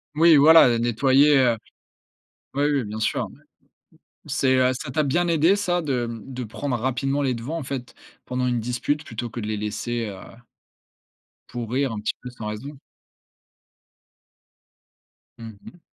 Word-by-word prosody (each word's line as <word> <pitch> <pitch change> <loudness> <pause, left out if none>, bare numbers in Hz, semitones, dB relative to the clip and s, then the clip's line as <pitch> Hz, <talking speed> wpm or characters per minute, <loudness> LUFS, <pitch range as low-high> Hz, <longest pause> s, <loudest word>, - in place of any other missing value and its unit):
Oui, 165 +1 +6
voilà, 160 +1 +8
heu, 120 -1 +2
nettoyer, 135 +5 +4
heu. 120 -4 +3 1.0
Ouais, 145 +2 +1
oui, 140 -4 0
bien 110 +1 -6
sûr, - - 0
ouais. - - -18 0.9
C'est, 130 -1 +1
heu, 130 0 +3
ça 135 +2 -6
t'a 155 +4 +1
bien 175 +5 +1
aidé 165 +3 +4
ça 180 -4 0
de 130 -6 -1 0.2
de 130 -2 -6
prendre 125 +4 -3
rapidement 130 +3 -1
les 135 -3 0
devants, 130 +9 -4
en - - -5
fait, 130 -1 -6 0.3
pendant 125 0 -2
une 120 -1 0
dispute 125 +6 -2
plutôt 115 -1 -5
que 120 - -7
de 105 - -5
les 110 0 -2
laisser 110 +3 -3
heu 100 -2 -7 1.3
pourrir 125 +2 -2
un 110 - -4
petit 105 - -2
peu 125 - -7
sans 115 -3 -8
raison? 135 +7 -7 2.6
Mmh 110 -2 -10
mh. 175 - -14
130 Hz, 160 wpm, -23 LUFS, 115-145 Hz, 2.6 s, voilà